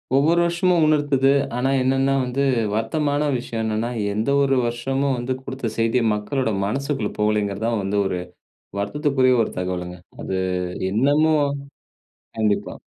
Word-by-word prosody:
ஒவ்வொரு 160 Hz, +5 st, +4 dB
வருஷமும் 170 Hz, -1 st, +2 dB
உணர்த்துது. 145 Hz, -3 st, +3 dB, 0.2 s
ஆனா, 130 Hz, +2 st, 0 dB
என்னன்னா, 135 Hz, +1 st, +2 dB
வந்து 130 Hz, +3 st, -1 dB, 0.3 s
வருத்தமான 145 Hz, +6 st, 0 dB
விஷயம் 115 Hz, -2 st, -4 dB
என்னன்னா, 110 Hz, +2 st, -1 dB, 0.2 s
எந்த 110 Hz, +6 st, -1 dB
ஒரு 135 Hz, -1 st, +2 dB
வருஷமும் 135 Hz, +3 st, -1 dB
வந்து 120 Hz, +2 st, -2 dB
குடுத்த 130 Hz, -5 st, -4 dB
செய்திய 115 Hz, +2 st, +2 dB
மக்களோட 110 Hz, +4 st, -1 dB
மனசுக்குள்ள 135 Hz, +1 st, -2 dB
போலேங்கிறதுதான் 105 Hz, +1 st, 0 dB
வந்து 100 Hz, +1 st, -1 dB
ஒரு 90 Hz, -2 st, -1 dB, 0.6 s
வருத்தத்திற்குரிய 130 Hz, +3 st, +1 dB
ஒரு -, -, -4 dB
தகவலுங்க. 90 Hz, -1 st, -4 dB, 0.2 s
அது 95 Hz, -, -3 dB, 0.5 s
இன்னமும் 145 Hz, +6 st, +3 dB, 0.9 s
கண்டிப்பா. 105 Hz, -2 st, 0 dB
130 Hz, 120 wpm, -22 LUFS, 110-140 Hz, 0.9 s, ஒவ்வொரு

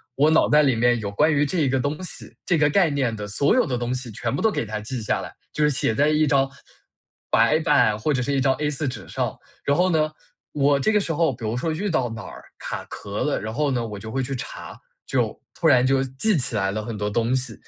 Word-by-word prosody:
我 150 Hz, +3 st, +4 dB
脑 160 Hz, -, +4 dB
袋 150 Hz, 0 st, +5 dB
里 135 Hz, -4 st, +3 dB
面 120 Hz, +1 st, +2 dB
有 100 Hz, -2 st, -4 dB
关 150 Hz, +10 st, +3 dB
于 145 Hz, 0 st, +2 dB
这 170 Hz, +4 st, -1 dB
一 140 Hz, -4 st, +2 dB
个 130 Hz, 0 st, +1 dB
东 145 Hz, +6 st, -2 dB
西 -, -, -7 dB
这 175 Hz, -, +2 dB
个 150 Hz, -1 st, +4 dB
概 175 Hz, 0 st, +3 dB
念 130 Hz, -6 st, -1 dB
的 105 Hz, -1 st, -6 dB
所 140 Hz, -, +2 dB
有 255 Hz, -, +3 dB
的 125 Hz, -2 st, -1 dB
东 120 Hz, +1 st, -2 dB
西 125 Hz, -2 st, -4 dB
全 135 Hz, -, -3 dB
部 -, -, -2 dB
都 220 Hz, -, +4 dB
给 115 Hz, -, -2 dB
它 105 Hz, 0 st, -4 dB
记 115 Hz, +3 st, -5 dB
下 -, -, 0 dB
来。 -, -, -8 dB, 0.2 s
就 150 Hz, -, 0 dB
是 150 Hz, -, +4 dB
写 120 Hz, -4 st, +1 dB
在 145 Hz, +2 st, +3 dB
一 155 Hz, 0 st, +3 dB
张 135 Hz, -1 st, +2 dB, 0.8 s
白 155 Hz, -, +4 dB
板 145 Hz, -10 st, +3 dB
或 150 Hz, +8 st, -1 dB
者 125 Hz, -, 0 dB
是 140 Hz, -, -1 dB
一 135 Hz, -, +1 dB
张 130 Hz, 0 st, +3 dB
A4 150 Hz, -1 st, -1 dB
纸 130 Hz, -, -6 dB
上。 -, -, -3 dB, 0.3 s
然 140 Hz, -, +2 dB
后 185 Hz, +1 st, +3 dB
呢， 155 Hz, -2 st, +1 dB, 0.4 s
我 140 Hz, -1 st, +3 dB
这 215 Hz, -, +2 dB
个 210 Hz, -, +3 dB
时 165 Hz, -4 st, -2 dB
候 165 Hz, -2 st, +2 dB
比 115 Hz, 0 st, -11 dB
如 110 Hz, +2 st, -1 dB
说 160 Hz, +5 st, -1 dB
遇 195 Hz, +6 st, -2 dB
到 130 Hz, -8 st, 0 dB
哪 110 Hz, -2 st, -7 dB
儿 -, -, -11 dB, 0.2 s
卡 -, -, -5 dB
壳 -, -, -5 dB
了， -, -, 0 dB
然 110 Hz, +1 st, -5 dB
后 150 Hz, +1 st, 0 dB
呢， 120 Hz, -2 st, -1 dB
我 105 Hz, -1 st, -7 dB
就 110 Hz, +1 st, -8 dB
会 135 Hz, -, -1 dB
去 135 Hz, +1 st, -3 dB
查， -, -, -8 dB, 0.3 s
就 -, -, -1 dB, 0.2 s
突 -, -, +1 dB
然 125 Hz, 0 st, +5 dB
就 135 Hz, 0 st, +2 dB
记 135 Hz, +11 st, 0 dB
起 125 Hz, -3 st, 0 dB
来 95 Hz, -1 st, 0 dB
了 110 Hz, +1 st, -3 dB
很 115 Hz, -3 st, -5 dB
多 105 Hz, 0 st, -2 dB
东 115 Hz, +4 st, 0 dB
西。 125 Hz, -3 st, -2 dB
135 Hz, 290 characters per minute, -23 LUFS, 115-150 Hz, 0.8 s, 袋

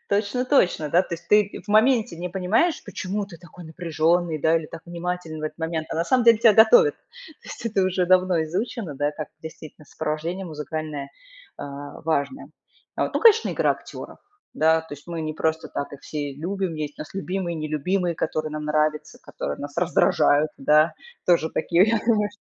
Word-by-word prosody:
Точно-точно, 205 Hz, -, +1 dB
да. 180 Hz, +2 st, +4 dB
То 175 Hz, -, -5 dB
есть 170 Hz, -, -13 dB
ты 210 Hz, -1 st, +2 dB
в 210 Hz, -, -24 dB
моменте 220 Hz, -3 st, +3 dB
не 180 Hz, +2 st, -4 dB
понимаешь, 200 Hz, -, +1 dB
почему 200 Hz, +1 st, -4 dB
ты 185 Hz, -4 st, -12 dB
такой 175 Hz, +1 st, -13 dB
напряжённый 165 Hz, 0 st, 0 dB
да 160 Hz, +2 st, +3 dB
или 160 Hz, -, -3 dB
так 165 Hz, -, -10 dB
внимателен 170 Hz, -2 st, -5 dB
в -, -, -8 dB
этот 155 Hz, +1 st, -5 dB
момент, 160 Hz, -1 st, -3 dB
а -, -, -3 dB
на 165 Hz, -, +1 dB
самом 250 Hz, +4 st, +2 dB
деле 230 Hz, -2 st, +7 dB
тебя 225 Hz, -1 st, +6 dB
готовят. 440 Hz, -, +6 dB
То -, -, -38 dB, 0.4 s
есть -, -, -7 dB
это 205 Hz, -4 st, +1 dB
уже 185 Hz, -1 st, +1 dB
давно 185 Hz, -2 st, +3 dB
изучено, 185 Hz, -, -4 dB
да, 145 Hz, +2 st, -1 dB
как 155 Hz, 0 st, -6 dB
действительно 155 Hz, -1 st, -11 dB
сопровождение 160 Hz, +5 st, -4 dB
музыкальное, 150 Hz, -2 st, -5 dB, 0.5 s
а, 145 Hz, 0 st, -8 dB
важное. 160 Hz, -, -2 dB, 0.5 s
Вот, -, -, -1 dB
ну, -, -, +1 dB
конечно, 450 Hz, -1 st, +5 dB
игра -, -, +2 dB
актёров. -, -, -10 dB, 0.4 s
Да, 160 Hz, +1 st, +3 dB
то 160 Hz, -2 st, -9 dB
есть 145 Hz, -, -16 dB
мы 170 Hz, -1 st, -5 dB
не 155 Hz, -1 st, -4 dB
просто 160 Hz, 0 st, -1 dB
так 140 Hz, -, -5 dB
их 140 Hz, -, -10 dB
все 145 Hz, -2 st, -5 dB
любим. 175 Hz, +4 st, -3 dB
Есть 150 Hz, -1 st, -5 dB
у -, -, -3 dB
нас -, -, -14 dB
любимые, 185 Hz, -2 st, -3 dB
нелюбимые, 165 Hz, +4 st, -1 dB
которые 155 Hz, -1 st, -2 dB
нам 150 Hz, 0 st, -4 dB
нравятся, 150 Hz, 0 st, -1 dB
которые 70 Hz, -, -5 dB
нас 145 Hz, 0 st, -8 dB
раздражают, 165 Hz, -3 st, +3 dB
да, 150 Hz, +4 st, +4 dB, 0.3 s
тоже 170 Hz, -2 st, +3 dB
такие 170 Hz, +3 st, +3 dB
я 225 Hz, 0 st, +2 dB
думаю 210 Hz, -3 st, +2 dB
чт 205 Hz, -, -20 dB
170 Hz, 190 wpm, -24 LUFS, 155-195 Hz, 0.5 s, деле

